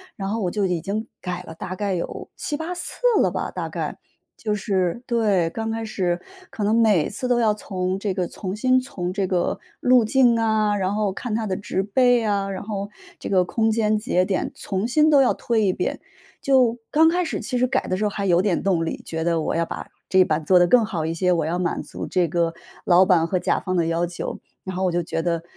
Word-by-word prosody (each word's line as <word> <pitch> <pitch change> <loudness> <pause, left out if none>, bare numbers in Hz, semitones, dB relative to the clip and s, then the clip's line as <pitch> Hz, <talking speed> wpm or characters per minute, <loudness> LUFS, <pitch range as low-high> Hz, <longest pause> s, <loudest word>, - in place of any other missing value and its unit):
然 195 -1 -4
后 220 +3 -1
我 185 -5 0
就 205 0 0
已 180 -2 0
经 210 +6 -3
改 180 -1 -5
了， - - -9
大 180 +3 -6
概 200 0 -2
有 170 - -5
7-8 320 +4 -3
次 355 - -5 0.2
了 - - +3
吧， - - -3
大 - - -4
概， - - -4 0.4
就 210 -2 -2
是 190 -1 -1
对， 210 -8 +1
刚 225 +5 -4
开 225 0 -3
始， 180 -5 -1 0.3
可 215 - -5
能 210 +2 +2
每 220 -8 +3
次 230 +5 -3
都 245 -1 +2
要 220 -2 +3
从 190 -2 -3
这 200 -1 -1
个 185 -1 -1
重新 220 +9 0
从 185 -9 -4
这 195 0 -1
个 180 -2 0 0.2
路 250 -2 +5
径 240 0 +4
啊， 215 -2 +2
然 190 +1 -1
后 210 -2 0
看 215 +3 -4
它 225 0 -1
的 190 -3 -2
植 195 -1 -2
被 245 +3 +3
啊， 200 -2 0
然 195 - -5
后 200 -1 -4 0.3
这 - - -6
个 185 -2 +4
空 220 +5 0
间 215 -1 +2
节 210 -4 +1
点， 185 0 -1
重新 240 +11 +1
都 285 -3 +6
要 260 - +3
推 225 -3 0
一 185 - +2
遍。 - - -2 0.4
就 255 -4 +3
刚 320 +2 +5
开 355 +1 +1
始 315 - -3
其 250 - -2
实 250 - +3
改 265 +1 -1
的 185 - -1
时 210 - -2
候 - - +2
还 200 -1 -3
有 175 -1 +4
点 190 -3 0
动 180 -4 +1
力， - - -4
觉 160 0 -4
得 165 -1 +1
我 - - -1
要 165 0 +1
把 - - -7 0.2
这 190 - +3
一 - - +8
版 155 -3 -1
做 180 +3 +5
得 175 - +5
更 230 +4 +5
好 175 -7 -3
一 160 - -1
些， 180 +2 +1
我 165 -3 0
要 165 +3 -1
满 175 -1 -1
足 - - -7
这 180 -2 +1
个 170 0 0 0.3
老 180 +1 +6
板 180 -4 +4
和 185 - 0
甲 - - +1
方 185 - -3
的 170 -2 +1
要 165 +1 +1
求。 175 0 -5 0.2
然 190 -1 -5
后 190 - 0
我 180 - +1
就 175 +1 0
觉 165 - -2
得： 170 -1 -1
195 Hz, 260 characters per minute, -23 LUFS, 180-225 Hz, 0.4 s, 一